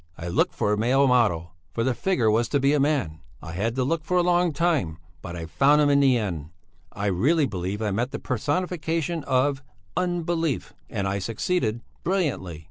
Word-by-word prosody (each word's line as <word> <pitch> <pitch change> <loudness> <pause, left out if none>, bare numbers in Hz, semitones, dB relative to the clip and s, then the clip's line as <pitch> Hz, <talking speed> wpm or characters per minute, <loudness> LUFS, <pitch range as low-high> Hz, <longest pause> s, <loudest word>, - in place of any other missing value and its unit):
I 85 - -5
looked 85 - +1
for 105 -2 +1
a - - 0
male 130 +5 +3
model, 105 -10 +2 0.2
for 115 - -2
the 130 +1 +1
figure 120 - +1
was 115 +1 +1
to 145 - +2
be 140 +2 +3
a 150 - +2
man; 135 - 0 0.2
I 80 - -8
had 110 +7 -2
to 130 - +1
look 155 +4 -1
for 180 +3 0
a 175 - +4
long 175 0 +3
time, 145 - 0 0.2
but 85 -1 -7
I 85 -1 -5
found 140 - +3
him 145 -1 +4
in 140 - +4
the 135 -3 +4
end; 85 -9 -3 0.4
I 100 - -4
really 135 - +2
believe 95 -1 -3
I 105 - 0
met 120 +6 -1
the - - -5
personification 160 +4 -2
of 130 +2 +1 0.3
Unbelief 170 -4 -1 0.2
and 100 -4 -2
I 100 +1 -1
succeeded 115 - -1 0.2
brilliantly. 145 - -1
130 Hz, 200 wpm, -25 LUFS, 100-155 Hz, 0.4 s, a